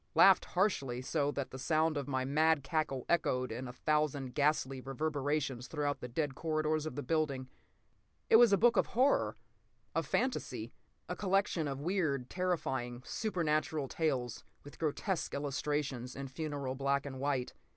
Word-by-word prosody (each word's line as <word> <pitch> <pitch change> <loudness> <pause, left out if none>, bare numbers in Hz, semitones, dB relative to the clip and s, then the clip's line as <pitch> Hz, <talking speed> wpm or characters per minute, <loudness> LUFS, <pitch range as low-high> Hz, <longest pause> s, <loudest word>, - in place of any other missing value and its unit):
Laughed 195 -1 +7
harshly, 140 - +1
so 145 +3 0
that 140 -2 -3
the 130 - -7
sound 155 +3 +2
of 145 -1 -3
my 130 -2 -1
mad 155 +1 +3
cackle 135 -3 -1
echoed 130 -7 +1
in 125 +3 -4
a - - -5
thousand 145 -2 0
ghastly 140 -3 +1
reverberations 140 -2 -2
through 145 -2 -1
the - - -5
dead 145 +3 -1
corridors 155 0 0
of 135 - -6
the 145 - -3
building. 140 -3 0 0.8
It - - +8
was 235 -2 +7
a 200 - +5
book 235 +3 +4
of - - +3
horror, 265 +3 +3 0.6
of - - -1
fantasy. 125 - -1 0.3
A 180 - -3
collection 190 -5 +1
of 135 0 -4
weird, 155 -7 0
terrifying, 130 -9 -2
supernatural 155 -7 0
tales 130 -6 -1 0.2
with 145 - -13
grotesque 165 +4 -1
illustrations 140 -2 -2
in 135 0 -5
funereal 140 -2 -3
black 140 +1 0
and 130 -2 -6
white. 135 -2 -1
145 Hz, 155 wpm, -33 LUFS, 130-160 Hz, 0.8 s, It